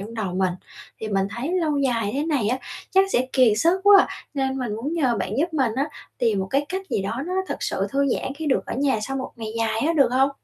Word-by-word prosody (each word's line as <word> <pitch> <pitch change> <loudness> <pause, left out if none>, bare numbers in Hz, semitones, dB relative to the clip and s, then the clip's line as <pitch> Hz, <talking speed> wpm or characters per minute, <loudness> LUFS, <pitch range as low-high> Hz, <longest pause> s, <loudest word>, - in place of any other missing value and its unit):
trong 220 +4 -8
đầu 195 -5 -3
mình. 185 -1 +1 0.5
Thì 220 - -4
mình 195 -2 +1
thấy 275 +9 -3
lâu 300 -3 0
dài 235 -6 +1
thế 290 +2 0
này 275 -10 +1
á 255 - 0 0.3
chắc 385 0 +5
sẽ 250 +1 +2
kiệt 250 -5 +5
sức 340 - +3
quá, 405 -1 +8 0.3
nên 265 -1 -1
mình 235 -5 -3
muốn 280 +8 -3
nhờ 260 -8 +1
bạn 190 - -3
giúp 325 +2 0
mình 260 -6 +2
á, 275 - +2 0.3
tìm 230 -5 +2
một 190 - -2
cái 280 +2 +1
cách 380 +1 -4
gì 195 - 0
đó 230 +7 -3
nó 365 - -3
thật - - -2
sự - - -1
thư 280 0 +2
giãn 265 +1 -2
khi 320 +1 -5
được 270 - +1
ở - - -4
nhà 270 -5 +2
sau 270 +5 -3
một 260 - -5
ngày 225 -2 -5
dài 225 -1 0
á, 330 - +2
được 275 -5 +5
hông? 270 +2 +3
265 Hz, 265 wpm, -23 LUFS, 225-290 Hz, 0.5 s, quá